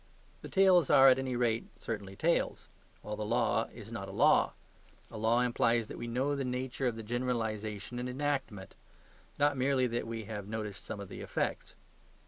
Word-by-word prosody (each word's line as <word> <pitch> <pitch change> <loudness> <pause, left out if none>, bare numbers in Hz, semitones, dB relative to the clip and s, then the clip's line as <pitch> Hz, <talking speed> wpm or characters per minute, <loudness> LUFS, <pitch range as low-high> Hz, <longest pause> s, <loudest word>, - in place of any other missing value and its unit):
The - - -8
tales 185 -5 +5
are, 135 0 +8
at 130 0 +4
any 130 -1 -2
rate, 115 -2 0
certainly 100 -4 -5
tales; 170 +10 0 0.4
while 105 - -4
the 105 - -4
law 115 +1 +1
is - - -11
not - - -5
a - - -6
law. - - +4 0.6
A 115 - -7
law 115 +2 +3
implies 120 -1 +2
that - - -7
we 120 - -4
know 130 +5 0
the 140 - -2
nature 130 +1 -2
of 120 - -1
the 115 - -7
generalisation 110 -2 -3
and 125 0 -3
enactment; 130 -7 -3 0.6
not 145 -1 +2
merely 130 0 +2
that 120 -1 -2
we 115 -1 -4
have 105 -1 -6
noticed 105 -2 -5
some 110 - -5
of 100 - -7
the - - -8
effects. - - -3
120 Hz, 185 wpm, -32 LUFS, 110-130 Hz, 0.6 s, are